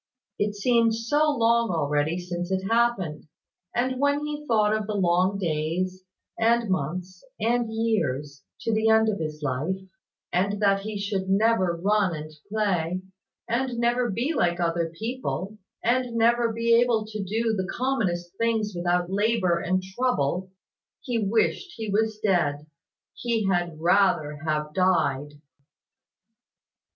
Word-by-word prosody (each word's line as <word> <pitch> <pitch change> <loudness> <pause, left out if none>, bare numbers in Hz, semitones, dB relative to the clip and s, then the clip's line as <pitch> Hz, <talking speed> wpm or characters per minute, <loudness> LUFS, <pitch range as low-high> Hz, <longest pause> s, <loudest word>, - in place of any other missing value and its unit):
It 205 0 0
seemed 230 +1 +3
so 290 +7 +2
long 230 0 +3
already 150 0 0
since 175 0 -4
it 190 0 -1
had 195 - -4
happened! 195 -11 0 0.5
And 255 +1 0
when 285 +1 +1
he 300 0 -5
thought 215 -2 +3
of 215 -1 -3
the 215 - -2
long 195 - +1 0.3
long - - -3
days, 180 +2 -2 0.4
and 230 -2 +2
months, 180 +3 -3 0.2
and 230 +1 +1
years, 150 - -1 0.2
to 225 - -1
the 220 +1 +2
end 220 0 +5
of 205 - -2
his 155 -1 -5
life, 145 +7 -1 0.6
and 200 +3 +1
that 195 -1 +3
he 210 +1 -5
should 200 -1 -2
never 195 -3 +3
run 195 -1 +1
and 155 0 -7 0.2
play, 185 -4 0 0.4
and 245 +1 -1
never 240 +1 +1
be 240 +10 -1
like 175 - +1
other 170 -1 0
people, 220 -3 -4 0.2
and 245 0 +1
never 230 0 +2
able 230 -1 +3
to 215 -1 -5
do 225 +4 0
the 190 -2 -2
commonest 195 -9 -1
things 225 -2 0
without 175 +1 0
labour 200 -4 +2
and 185 +2 0
trouble, 190 - -1 0.5
he 245 -5 -1
wished 225 - 0
he 220 -3 -4
was 220 +1 +1
dead. 170 -8 +1 0.5
He 230 -3 -1
had 175 -4 0
rather 170 -4 +2
have 150 -1 -1
died. 145 -6 +1
205 Hz, 140 wpm, -26 LUFS, 175-230 Hz, 0.6 s, end